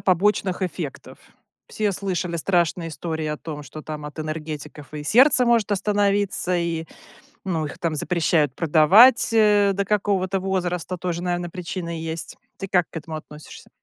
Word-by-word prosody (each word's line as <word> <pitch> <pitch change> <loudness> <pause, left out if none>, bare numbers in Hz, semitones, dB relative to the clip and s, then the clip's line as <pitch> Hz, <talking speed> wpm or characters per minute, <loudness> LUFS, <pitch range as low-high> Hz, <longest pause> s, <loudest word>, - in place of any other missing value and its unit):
побочных 190 0 +1
эффектов? 170 -6 -5 0.5
Все 210 -2 -1
слышали 180 -3 -3
страшные 170 -1 0
истории 160 0 -4
о 150 0 -2
том, 150 -2 -7
что 155 +3 -10
там 150 -1 -7
от 150 +2 -9
энергетиков 155 -1 -6
и 150 -1 -6
сердце 255 - +5
может 230 -3 +2
остановиться, 200 -2 +1
и, 165 -1 -2 0.6
ну, 165 -4 -1
их - - -7
там 165 -2 -2
запрещают 155 -4 +1
продавать, 180 - +6
э, 210 -2 +4
до 200 +1 -1
какого-то 195 -2 0
возраста. 185 -1 -2
Тоже, 175 -1 -3
наверно, 175 -1 -2
причина 170 -1 -5
есть. 160 0 -6 0.2
Ты 195 - -5
как 180 -2 +1
к - - -7
этому 160 0 -7
относишься? 150 0 -12
175 Hz, 150 wpm, -23 LUFS, 160-195 Hz, 0.6 s, продавать